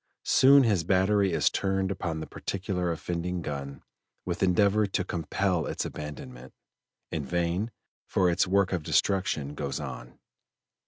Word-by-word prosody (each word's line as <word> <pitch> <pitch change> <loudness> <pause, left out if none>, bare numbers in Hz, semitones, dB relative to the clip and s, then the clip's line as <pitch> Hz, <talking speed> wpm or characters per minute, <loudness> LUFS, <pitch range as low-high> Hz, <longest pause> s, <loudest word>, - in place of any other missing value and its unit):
Soon 140 +1 +6
his 100 -8 +2
battery 95 +2 +2
is 85 - +2
turned 95 -1 0
upon 85 -4 -3
the - - -4
particular 90 -2 -3
offending 85 +1 -3
gun 70 -1 -6 0.4
with 85 -1 -3
endeavor 100 +3 +3
to 95 - -1
compel 90 0 -1
its - - -3
abandonment; 65 -5 -8 0.6
in 75 - -2
vain, 85 - -1 0.4
for 95 - +2
its 90 +1 +2
work 95 0 +2
of 90 - 0
destruction 75 -5 0
goes 70 -2 -4
on. - - -8
90 Hz, 140 wpm, -28 LUFS, 80-95 Hz, 0.6 s, Soon